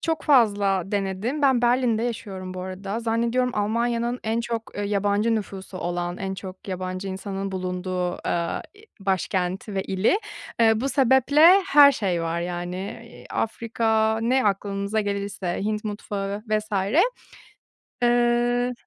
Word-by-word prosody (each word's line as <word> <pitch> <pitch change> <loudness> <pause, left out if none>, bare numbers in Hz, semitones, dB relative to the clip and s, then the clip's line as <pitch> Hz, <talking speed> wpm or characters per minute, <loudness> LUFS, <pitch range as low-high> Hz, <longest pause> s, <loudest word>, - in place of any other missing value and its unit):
çok 325 -2 -1
fazla 205 - +3
denedim. 200 +8 -2
Ben 265 -3 +4
Berlin'de 240 -2 +2
yaşıyorum 195 -6 -5
bu 185 - -5
arada. 195 +4 -5
Zannediyorum 235 +2 +1
Almanya'nın 235 +3 0
en 225 +1 0
çok, 235 -1 -3
eee, 205 - -2
yabancı 205 +2 +1
nüfusu 195 -3 -5
olan, 175 0 -3
en 190 0 -4
çok 190 0 -9
yabancı 185 +1 -4
insanın 195 0 -4
bulunduğu, 180 -1 -2
aaa, 170 -1 -1
i 415 - -17 0.2
başkenti 190 +1 -1
ve 190 - 0
ili. 190 - +1 0.4
Eee, 220 -1 +4
bu 270 - 0
sebeple 280 +7 +5
her 290 -5 +8
şey 185 -8 -1
var 165 +1 -2
yani. 175 +1 -4 0.3
Eee, 235 - -14
Afrika, 220 -1 0
ne 255 +3 +2
aklınıza 200 +1 0
gelirse, 200 -3 -3
Hint 215 +1 -2
mutfağı 205 -1 -4
vs. 215 0 -1 1.3
Eee 240 0 +2
205 Hz, 135 wpm, -24 LUFS, 190-235 Hz, 1.3 s, her